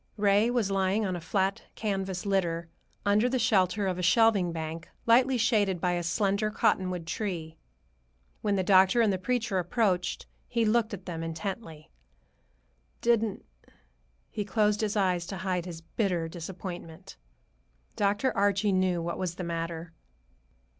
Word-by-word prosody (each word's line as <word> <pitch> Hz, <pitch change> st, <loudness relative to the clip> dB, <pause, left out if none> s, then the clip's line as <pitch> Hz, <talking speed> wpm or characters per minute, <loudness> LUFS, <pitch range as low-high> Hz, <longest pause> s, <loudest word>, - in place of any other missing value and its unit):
Ray 205 Hz, +2 st, +3 dB
was 235 Hz, -5 st, 0 dB
lying 195 Hz, +2 st, +1 dB
on 185 Hz, -2 st, -1 dB
a 175 Hz, -, -5 dB
flat 190 Hz, +3 st, 0 dB
canvas 195 Hz, -3 st, -3 dB
litter, 175 Hz, -4 st, 0 dB, 0.4 s
under 210 Hz, +4 st, +3 dB
the 255 Hz, -, 0 dB
shelter 205 Hz, -4 st, +2 dB
of 185 Hz, -1 st, -1 dB
a -, -, -1 dB
shelving 195 Hz, -1 st, +4 dB
bank, 160 Hz, 0 st, -5 dB, 0.2 s
lightly 250 Hz, +3 st, +4 dB
shaded 210 Hz, -6 st, +2 dB
by 180 Hz, +1 st, +1 dB
a 175 Hz, 0 st, 0 dB
slender 200 Hz, +4 st, 0 dB
cottonwood 185 Hz, -4 st, 0 dB
tree. 165 Hz, -3 st, -4 dB, 0.8 s
When 205 Hz, -1 st, +1 dB
the 190 Hz, -, +1 dB
doctor 190 Hz, +4 st, +5 dB
and 215 Hz, -3 st, +3 dB
the 185 Hz, -, -2 dB
preacher 220 Hz, -2 st, 0 dB
approached, 180 Hz, 0 st, 0 dB, 0.2 s
he 235 Hz, -2 st, +1 dB
looked 220 Hz, -1 st, +2 dB
at 190 Hz, -1 st, -14 dB
them 165 Hz, -2 st, -5 dB
intently. 165 Hz, -1 st, -6 dB, 1.1 s
"Didn't—" 225 Hz, -3 st, +1 dB, 0.9 s
he 210 Hz, -, -2 dB
closed 210 Hz, 0 st, +1 dB
his 215 Hz, -1 st, -1 dB
eyes 180 Hz, -3 st, +1 dB
to 195 Hz, -, -5 dB
hide 185 Hz, -1 st, -2 dB
his 165 Hz, -2 st, -7 dB
bitter 175 Hz, -2 st, -1 dB
disappointment. 175 Hz, +1 st, -8 dB, 0.8 s
Dr. 205 Hz, +4 st, +1 dB
Archie 200 Hz, 0 st, +2 dB
knew 185 Hz, -2 st, +1 dB
what 170 Hz, 0 st, -3 dB
was 180 Hz, -2 st, -2 dB
the 180 Hz, -, -5 dB
matter. 165 Hz, 0 st, -4 dB
190 Hz, 145 wpm, -28 LUFS, 175-210 Hz, 1.1 s, doctor